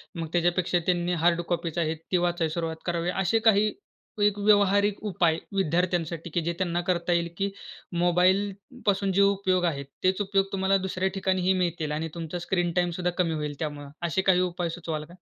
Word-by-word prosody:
मग 165 -1 -4
त्याच्यापेक्षा 175 +1 +2
त्यांनी 175 -1 +1
हार्ड 175 0 +4
कॉपीज 170 -2 -2
आहेत 160 -1 0
ती 180 - +4
वाचायला 175 -2 0
सुरुवात 165 -1 -3
करावी. 170 0 -1
असे 190 +4 +1
काही 210 0 +5 0.5
एक 205 0 +3
व्यावहारिक 205 0 +3
उपाय 165 -3 +2 0.2
विद्यार्थ्यांसाठी, 170 -1 0
की 170 +2 -1
जे 170 +2 -2
त्यांना 175 -1 0
करता 175 -1 +1
येईल 170 0 0
की 200 +1 0 0.5
मोबाईलपासून 195 +3 +1
जे 200 - +4
उपयोग 190 -2 +2
आहेत, 140 -5 -1 0.2
तेच 185 +2 +2
उपयोग 195 -1 +1
तुम्हाला 195 0 +2
दुसऱ्या 190 +1 -1
ठिकाणीही 190 -1 +1
मिळतील 165 -3 -2
आणि 160 +2 -2
तुमचा 170 +1 -4
स्क्रीन 175 0 0
टाईम 175 -1 +2
सुद्धा 180 0 0
कमी 170 -3 +1
होईल 150 -2 -3
त्यामुळे 145 -2 -4 0.2
असे 190 +4 0
काही 190 -1 +4
उपाय 175 -1 -1
सुचवाल 165 -2 -4
का? 170 - -16
175 Hz, 175 wpm, -27 LUFS, 170-190 Hz, 0.5 s, काही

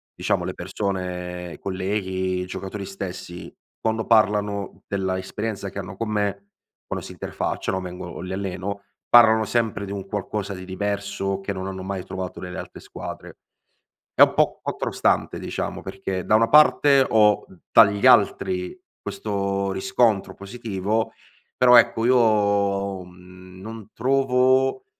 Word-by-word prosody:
diciamo - - 0
le - - -3
persone 90 -3 -4
colleghi, 95 -1 -2
i - - -4
giocatori 95 +2 -6
stessi, 95 -2 -7 0.3
quando 110 0 -1
parlano 105 -2 +1
della 95 -2 -1
esperienza 100 +1 -4
che 100 - -7
hanno 100 0 -7
con 115 +1 -3
me, 100 -1 -2 0.4
quando - - -4
si - - -9
interfacciano 95 0 -3
vengo 90 -1 -7
o 85 - -8
li 90 +1 -6
alleno, 100 +1 -4 0.3
parlano 110 -2 +7
sempre 110 -1 -1
di 100 - -7
un 100 -1 -5
qualcosa 100 0 -3
di 95 -1 -8
diverso 100 0 -3
che 95 - -4
non 95 -1 -4
hanno 95 -1 -6
mai 95 -1 -4
trovato 95 -1 -6
nelle 90 0 -7
altre - - -9
squadre. - - -9 0.7
È - - +1
un - - +4
po' - - +2
contrastante - - 0
diciamo, - - -4
perché 95 -1 -4
da 110 - +4
una 115 +1 +4
parte 145 -2 +6
ho 105 -2 +4 0.3
dagli 100 -2 +5
altri 90 - +3 0.2
questo 100 - -2
riscontro 95 +2 +1
positivo, 105 0 -3 0.5
però 125 -1 +6
ecco 115 -1 +4
io, 100 -5 +2
mhmm, 90 +1 -15
non 110 0 -9
trovo, 130 - +2
100 Hz, 140 wpm, -23 LUFS, 95-110 Hz, 0.7 s, parlano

